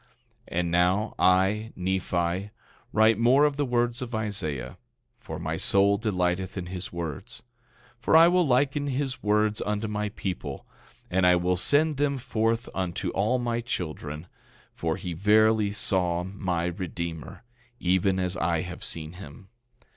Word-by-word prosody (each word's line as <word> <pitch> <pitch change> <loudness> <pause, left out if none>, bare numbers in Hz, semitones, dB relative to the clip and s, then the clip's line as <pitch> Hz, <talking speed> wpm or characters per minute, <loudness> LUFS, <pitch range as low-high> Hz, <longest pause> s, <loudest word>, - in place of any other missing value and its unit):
11:2 120 - -34 0.5
And 85 -1 0
now 90 +5 +2
I, 95 +4 +3
Nephi, 90 0 -1 0.4
write 110 0 +4
more 130 +5 +5
of 145 -1 +1
the 145 -1 -1
words 120 0 0
of 120 -2 -4
Isaiah, 80 - -3 0.4
for - - -7
my - - -3
soul 100 +1 +3
delighteth 95 -3 -1
in 90 - -3
his 90 0 -6
words. 85 +6 -6 0.6
For 160 - +4
I 165 +1 +8
will 175 -1 +3
liken 140 +3 +2
his 135 -1 -2
words 105 0 +1
unto 105 +1 -2
my 105 0 -2
people, 90 -9 -5 0.5
and 95 +1 +2
I 90 0 +6
will 90 +1 +1
send 145 - +2
them 140 -1 +1
forth 115 -2 -1
unto 90 -2 -2
all 110 +6 +1
my 120 -1 -1
children, 80 -8 -5 0.5
for 80 -1 -2
he 90 - -5
verily 105 +3 +3
saw 90 -4 0
my 90 -3 -2
Redeemer, 85 +1 -5 0.4
even 95 +1 +2
as 90 -1 -1
I 85 0 +1
have 90 -1 -7
seen 80 0 -5
him. 90 +1 -12
100 Hz, 150 wpm, -27 LUFS, 90-115 Hz, 0.6 s, I